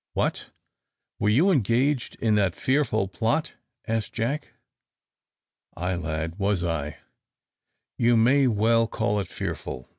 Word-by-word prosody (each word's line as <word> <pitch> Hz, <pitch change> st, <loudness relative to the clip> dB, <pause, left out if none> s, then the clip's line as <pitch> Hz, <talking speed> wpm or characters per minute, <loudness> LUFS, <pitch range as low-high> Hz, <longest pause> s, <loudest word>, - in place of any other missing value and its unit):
"What! -, -, -1 dB, 0.7 s
were 105 Hz, -, +2 dB
you 155 Hz, -, +4 dB
engaged 130 Hz, -, +1 dB
in 110 Hz, -2 st, +1 dB
that 95 Hz, -4 st, +2 dB
fearful 130 Hz, -7 st, +1 dB
plot?" 115 Hz, -, -1 dB, 0.3 s
asked 115 Hz, -1 st, -2 dB
Jack. 135 Hz, +6 st, -3 dB, 1.2 s
"Ay, 90 Hz, +2 st, -1 dB
lad, 80 Hz, +1 st, -3 dB
was 100 Hz, -2 st, +1 dB
I: 75 Hz, -4 st, -2 dB, 1.0 s
you 120 Hz, 0 st, +4 dB
may 130 Hz, +4 st, +4 dB
well 115 Hz, +1 st, +3 dB
call 105 Hz, -1 st, -1 dB
it 95 Hz, -, -3 dB
fearful!" 65 Hz, -, -6 dB
110 Hz, 120 wpm, -25 LUFS, 95-125 Hz, 1.2 s, you